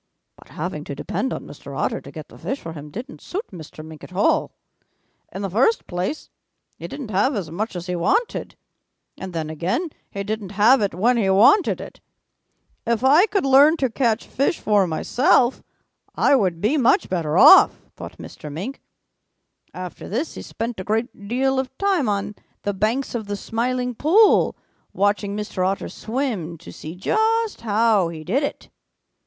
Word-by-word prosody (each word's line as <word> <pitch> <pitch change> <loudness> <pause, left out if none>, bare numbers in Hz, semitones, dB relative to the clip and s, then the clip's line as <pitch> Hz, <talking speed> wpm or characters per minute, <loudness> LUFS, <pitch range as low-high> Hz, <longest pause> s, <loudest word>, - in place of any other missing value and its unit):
"But - - -18
having - - -5
to - - -6
depend - - -3
on - - -5
Mr. - - -10
Otter - - -1
to - - -11
get - - -9
the - - -14
fish 270 - -3
for 165 - -8
him 150 -1 -9
didn't 245 - -8
suit 400 +6 -5
Mr. 155 -3 -10
Mink 160 -1 -12
at - - -11
all. 200 - +2 0.8
In 195 - -6
the 195 - -2
first 260 - +2
place, 180 - -4 0.5
he - - -6
didn't 255 -7 -7
have 210 +8 +2
as 180 -7 -4
much 210 +5 -3
as 175 -1 -5
he 180 -1 -3
wanted. 415 - 0 0.6
And 190 - -6
then 160 -2 -4
again 185 - -2 0.2
he 200 - -5
didn't 210 -1 -4
have 220 +6 +5
it 200 -4 -1
when 235 +7 +2
he 200 -4 +1
wanted 230 - +5
it. - - -10 0.8
'If 235 0 -1
I 300 +10 +6
could 395 -7 0
learn 280 +4 +6
to 260 -5 0
catch 230 -2 0
fish 280 +5 -1
for 205 -3 +2
myself, 240 - +2 0.5
I 285 - +4
would 185 -9 +1
be 240 +9 +2
much 255 -3 +3
better 165 -5 -1
off,' - - +7
thought - - -9
Mr. 150 - -9
Mink. 195 - -6 0.9
After 180 -2 -8
this 260 - -2
he - - -8
spent 230 -2 -5
a - - -4
great 215 0 -3
deal 265 +3 +1
of 265 0 -5
time 380 - +1
on 205 0 -2 0.3
the 205 - -1
banks 220 +7 -1
of 220 -4 -4
the 205 - -2
Smiling 250 +4 -2
Pool 370 - +4 0.4
watching 205 0 0
Mr. 210 -3 -3
Otter 195 +2 -1
swim 220 - -3
to 170 - -12
see 160 +3 -8
just 445 - 0
how 215 -3 +2
he 160 -2 -7
did 225 - 0
it. 285 - -4
215 Hz, 180 wpm, -22 LUFS, 185-265 Hz, 0.9 s, off